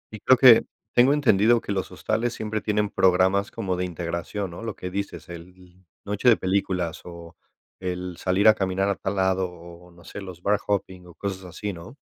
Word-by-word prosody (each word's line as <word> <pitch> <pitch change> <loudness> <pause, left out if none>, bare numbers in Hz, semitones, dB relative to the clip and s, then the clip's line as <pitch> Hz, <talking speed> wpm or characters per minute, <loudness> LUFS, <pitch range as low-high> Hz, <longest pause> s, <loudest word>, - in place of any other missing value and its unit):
Y - - -9
creo 130 +5 +5
que 125 -3 +8 0.3
tengo 125 +3 +5
entendido 120 -5 +4
que 100 - -6
los 95 -1 -3
hostales 110 +7 -2
siempre 110 0 -3
tienen 105 -1 0
programas 95 +2 +3
como 95 -5 -3
de 90 - -2
integración, 85 +3 -4
¿no? 85 - -9
Lo 115 - -5
que 90 - -7
dices, 95 -5 -5
el, 90 +1 -13 0.2
noche 105 +5 +2
de 115 - +5
películas 95 -3 -1
o 85 -1 -11 0.4
el 90 -1 -5
salir 95 +3 +2
a 110 - +9
caminar 95 -1 -1
a 100 - 0
tal 95 +3 -4
lado 95 -1 +1
o 85 0 -13
o, - - -19
no 85 +1 -18
sé, 105 - -9
los 90 -2 -10
bar 105 +1 +2
hopping 95 -3 -3
o 85 - -15
cosas 95 -2 -5
así, 100 +3 -5
¿no? 90 +10 -11
95 Hz, 205 wpm, -24 LUFS, 90-105 Hz, 0.4 s, a